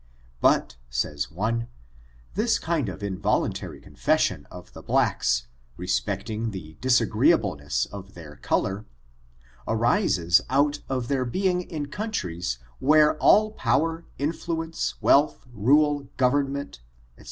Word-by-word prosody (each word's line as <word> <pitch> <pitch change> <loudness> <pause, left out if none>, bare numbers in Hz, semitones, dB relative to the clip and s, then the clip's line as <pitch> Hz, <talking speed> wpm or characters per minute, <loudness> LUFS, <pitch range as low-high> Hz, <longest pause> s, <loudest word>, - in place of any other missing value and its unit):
But, - - +2
says 70 +4 -2
one, 115 +7 -2 0.7
this 225 +4 +2
kind 160 - -1
of 90 - -8
involtmtary 95 -5 -2
confession - - 0
of - - -12
the - - -10
blacks, - - +1 0.3
respecting 105 +5 -2
the 80 -6 -8
disagreeableness 95 - +2
of 95 -1 -11
their 75 -4 -11
color, 100 +3 -1 0.8
arises 110 - +3
out 145 +2 +2
of 130 -3 -2
their 135 -1 0
bemg 180 +7 0
in 150 -3 -4
countries 90 - -3 0.2
where 150 +2 +5
all 215 +5 +5
power, 165 - 0
influence, 165 +2 -3
wealth, 145 +1 +3
rule, 145 +6 +3
government, 140 - 0
&c. - - -29
125 Hz, 110 wpm, -25 LUFS, 95-150 Hz, 0.8 s, where